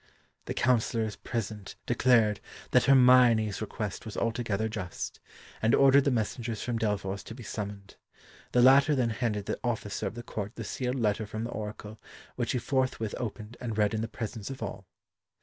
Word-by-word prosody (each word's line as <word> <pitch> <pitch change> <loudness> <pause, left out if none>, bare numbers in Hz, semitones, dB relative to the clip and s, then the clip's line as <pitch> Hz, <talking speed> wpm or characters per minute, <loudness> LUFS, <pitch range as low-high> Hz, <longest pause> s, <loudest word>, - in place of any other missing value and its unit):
The - - -4
councillors 115 -3 +1
present 105 -3 -5
declared 115 -4 +3 0.3
that - - +4
Hermione's 125 -6 +5
request 105 -2 -4
was 110 -4 -7
altogether 115 -2 -1
just, 100 -6 -5 0.4
and 110 +1 +4
ordered 135 0 +6
the - - +4
messengers 115 -1 -2
from 120 -2 -2
Delphos 100 -2 -1
to 110 - -8
be 125 - -10
summoned. 100 -1 -6 0.5
The 125 - +4
latter 140 +4 +6
then 120 -3 +1
handed 105 -3 -2
to - - -2
the - - -6
officer 110 -4 -2
of 95 - -6
the 120 - -6
court 105 -2 -5
the 115 - -5
sealed 125 +4 -2
letter 110 -3 0
from 110 +1 -4
the 120 - -4
Oracle, 105 0 -7 0.3
which - - -1
he - - +1
forthwith 125 -3 -1
opened 110 0 -6
and 115 -4 -4
read 105 -1 +2
in 110 - -1
the 115 - -2
presence 110 -1 -6
of 135 -4 -6
all. 95 -2 -6
110 Hz, 180 wpm, -29 LUFS, 105-125 Hz, 0.5 s, ordered